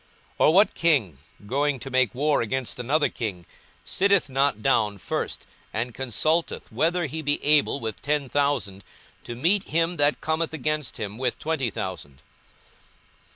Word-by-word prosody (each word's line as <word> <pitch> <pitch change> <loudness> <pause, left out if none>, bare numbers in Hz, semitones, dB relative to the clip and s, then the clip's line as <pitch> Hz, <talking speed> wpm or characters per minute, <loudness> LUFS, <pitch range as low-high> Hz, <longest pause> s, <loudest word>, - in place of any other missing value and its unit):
42:014:031 - - +5
Or - - +3
what 200 +3 +5
king, 135 - +1 0.3
going 140 +4 0
to 135 - -8
make 130 -5 +2
war 145 +3 +2
against 125 +2 -3
another 145 +5 +2
king, 95 -7 -5 0.4
sitteth 200 -5 +2
not 135 -5 +1
down 105 -3 +2
first, - - -4 0.3
and 115 +2 -3
consulteth 155 +7 -1
whether 175 +1 +1
he 155 +2 -5
be 145 -1 0
able 150 -1 +4
with 110 -3 -5
ten 145 -1 0
thousand 130 -9 -1 0.4
to 120 - -7
meet 185 - +2
him 165 +2 0
that 145 0 +3
cometh 160 +1 -1
against 150 -1 -2
him 105 0 -5
with 125 -2 -1
twenty 155 -6 -1
thousand? 70 -9 -6
140 Hz, 155 wpm, -25 LUFS, 115-155 Hz, 0.4 s, 42:014:031